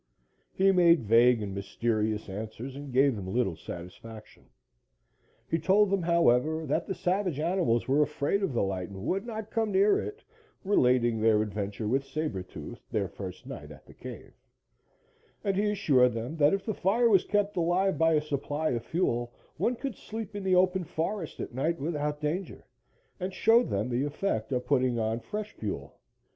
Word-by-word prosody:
He 195 Hz, +1 st, +3 dB
made 170 Hz, -6 st, +5 dB
vague 115 Hz, +1 st, +5 dB
and 100 Hz, -1 st, -5 dB
mysterious 110 Hz, +2 st, -1 dB
answers 110 Hz, +6 st, -6 dB
and 140 Hz, -1 st, -8 dB
gave 135 Hz, 0 st, +4 dB
them 95 Hz, -2 st, -5 dB
little 110 Hz, -6 st, 0 dB
satisfaction. 90 Hz, +7 st, -10 dB, 1.0 s
He 165 Hz, -, 0 dB
told 195 Hz, +5 st, +3 dB
them, 195 Hz, -2 st, +2 dB
however, 160 Hz, -2 st, +2 dB
that -, -, -1 dB
the 190 Hz, -, -3 dB
savage 180 Hz, -4 st, -1 dB
animals 160 Hz, -8 st, +1 dB
were 140 Hz, +3 st, +3 dB
afraid 150 Hz, +6 st, 0 dB
of 195 Hz, -, 0 dB
the 120 Hz, -, 0 dB
light 95 Hz, -2 st, -3 dB
and 95 Hz, +1 st, -8 dB
would 195 Hz, -, -1 dB
not 220 Hz, -2 st, -6 dB
come 225 Hz, -2 st, 0 dB
near 200 Hz, +2 st, +4 dB
it, 425 Hz, +2 st, -6 dB, 0.4 s
relating 125 Hz, -, +3 dB
their 110 Hz, -1 st, +4 dB
adventure 105 Hz, 0 st, -4 dB
with 135 Hz, +5 st, +1 dB
Saber 135 Hz, -7 st, -3 dB
Tooth 90 Hz, -, -9 dB
their -, -, -1 dB
first -, -, -8 dB
night -, -, -8 dB
at -, -, -14 dB
the -, -, -15 dB
cave, -, -, -10 dB, 1.1 s
and 195 Hz, -1 st, 0 dB
he 205 Hz, +2 st, +1 dB
assured 135 Hz, -12 st, +3 dB
them 120 Hz, +7 st, -4 dB
that 145 Hz, -1 st, +5 dB
if 195 Hz, -, -6 dB
the 215 Hz, -, -1 dB
fire 215 Hz, +6 st, +2 dB
was 195 Hz, -5 st, +5 dB
kept 205 Hz, 0 st, 0 dB
alive 180 Hz, +2 st, +1 dB
by 165 Hz, 0 st, +4 dB
a 150 Hz, -, +3 dB
supply 150 Hz, +1 st, -2 dB
of 120 Hz, -2 st, -2 dB
fuel, 120 Hz, -7 st, -1 dB, 0.3 s
one 245 Hz, -, +1 dB
could 265 Hz, -2 st, -5 dB
sleep 220 Hz, -2 st, -7 dB
in 205 Hz, -, -4 dB
the 190 Hz, -1 st, +3 dB
open 185 Hz, 0 st, +3 dB
forest 165 Hz, +2 st, -4 dB
at -, -, -5 dB
night 155 Hz, +6 st, -1 dB
without 150 Hz, 0 st, -2 dB
danger, 160 Hz, +5 st, -3 dB, 0.5 s
and 185 Hz, +1 st, -4 dB
showed 230 Hz, +3 st, +4 dB
them 100 Hz, +4 st, -1 dB
the 125 Hz, +1 st, 0 dB
effect 145 Hz, -, -2 dB
of 125 Hz, -1 st, -1 dB
putting 130 Hz, -3 st, +2 dB
on 110 Hz, 0 st, -1 dB
fresh 210 Hz, -, -5 dB
fuel. 105 Hz, -, -6 dB
150 Hz, 180 wpm, -29 LUFS, 115-190 Hz, 1.1 s, made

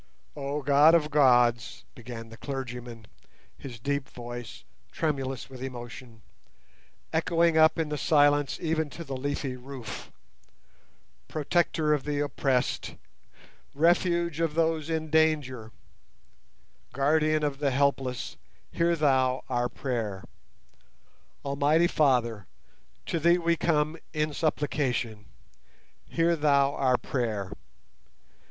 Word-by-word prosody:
"Oh 145 Hz, 0 st, -3 dB
God 145 Hz, +4 st, +6 dB
of 150 Hz, -2 st, +1 dB
gods!" 120 Hz, -6 st, +3 dB
began 115 Hz, -1 st, -9 dB
the 115 Hz, -, -12 dB
clergyman, 125 Hz, -4 st, -6 dB, 0.5 s
his 125 Hz, -4 st, -9 dB
deep 140 Hz, +3 st, -2 dB
voice, 120 Hz, -1 st, -8 dB, 0.3 s
tremulous 135 Hz, -5 st, -2 dB
with 130 Hz, -2 st, -11 dB
emotion, 120 Hz, -2 st, -8 dB, 0.9 s
echoing 165 Hz, 0 st, +2 dB
up 160 Hz, +1 st, +5 dB
in 160 Hz, -2 st, -1 dB
the 150 Hz, -1 st, -3 dB
silence 145 Hz, -2 st, +3 dB
even 160 Hz, -2 st, -1 dB
to 170 Hz, +5 st, -8 dB
the 135 Hz, -4 st, -6 dB
leafy 135 Hz, 0 st, -3 dB
roof; 125 Hz, -5 st, -8 dB, 1.2 s
"Protector 155 Hz, 0 st, +1 dB
of 145 Hz, -3 st, 0 dB
the 145 Hz, -1 st, -2 dB
oppressed, 135 Hz, -3 st, -1 dB, 0.8 s
Refuge 170 Hz, +1 st, +2 dB
of 165 Hz, -2 st, 0 dB
those 160 Hz, -1 st, 0 dB
in 160 Hz, -1 st, -2 dB
danger, 145 Hz, -8 st, +1 dB, 1.2 s
Guardian 155 Hz, +3 st, +2 dB
of 145 Hz, -2 st, -1 dB
the 145 Hz, -1 st, +1 dB
helpless, 135 Hz, -2 st, -1 dB, 0.3 s
hear 170 Hz, 0 st, +1 dB
Thou 130 Hz, -4 st, +2 dB
our 120 Hz, -1 st, 0 dB
prayer! 115 Hz, -7 st, -3 dB, 1.2 s
Almighty 145 Hz, +4 st, +3 dB
Father, 120 Hz, -, +1 dB, 0.6 s
to 165 Hz, -, -1 dB
Thee 170 Hz, +2 st, +4 dB
we 170 Hz, -1 st, +1 dB
come 155 Hz, -1 st, 0 dB, 0.2 s
in 155 Hz, 0 st, -1 dB
supplication. 135 Hz, -8 st, -1 dB, 0.8 s
Hear 170 Hz, +1 st, +2 dB
Thou 140 Hz, -2 st, +3 dB
our 130 Hz, -3 st, +2 dB
prayer! 110 Hz, -8 st, -3 dB
140 Hz, 110 wpm, -27 LUFS, 125-155 Hz, 1.2 s, God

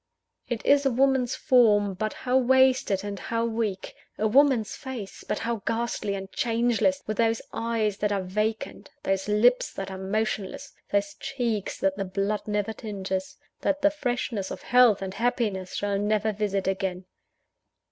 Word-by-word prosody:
It 240 Hz, -3 st, -3 dB
is 285 Hz, 0 st, +5 dB
a 270 Hz, -, +3 dB
woman's 260 Hz, 0 st, +2 dB
form; 210 Hz, -6 st, +4 dB
but 215 Hz, +3 st, -2 dB
how 250 Hz, 0 st, -2 dB
wasted 260 Hz, -5 st, +4 dB
and 200 Hz, -1 st, -5 dB
how 230 Hz, +4 st, -1 dB
weak! 220 Hz, -4 st, -2 dB, 0.2 s
a 215 Hz, -, +1 dB
woman's 260 Hz, -2 st, +3 dB
face; 250 Hz, -7 st, -7 dB
but -, -, -2 dB
how 235 Hz, 0 st, -2 dB
ghastly 230 Hz, -3 st, -1 dB
and 195 Hz, 0 st, -7 dB
changeless, 240 Hz, +4 st, +1 dB
with 215 Hz, -, -3 dB
those 225 Hz, -1 st, +2 dB
eyes 225 Hz, -3 st, -1 dB
that 210 Hz, 0 st, 0 dB
are 200 Hz, -2 st, 0 dB
vacant, 215 Hz, +4 st, -3 dB
those 195 Hz, 0 st, 0 dB
lips 230 Hz, +4 st, +3 dB
that 195 Hz, 0 st, -5 dB
are 190 Hz, -, -6 dB
motionless, 205 Hz, 0 st, -3 dB, 0.2 s
those 200 Hz, 0 st, +1 dB
cheeks 235 Hz, -7 st, -2 dB
that 195 Hz, 0 st, +1 dB
the 195 Hz, -, -2 dB
blood 200 Hz, +3 st, -2 dB
never 210 Hz, +1 st, -1 dB
tinges, 190 Hz, -3 st, -4 dB, 0.2 s
that 290 Hz, 0 st, -1 dB
the 300 Hz, -, +5 dB
freshness 245 Hz, -8 st, -2 dB
of 185 Hz, -, -7 dB
health 245 Hz, -6 st, +5 dB
and 190 Hz, -1 st, -4 dB
happiness 210 Hz, -4 st, -1 dB
shall 200 Hz, -1 st, -1 dB
never 215 Hz, +1 st, +1 dB
visit 200 Hz, -2 st, -1 dB
again! 190 Hz, -1 st, -2 dB
215 Hz, 160 wpm, -26 LUFS, 195-240 Hz, 0.2 s, is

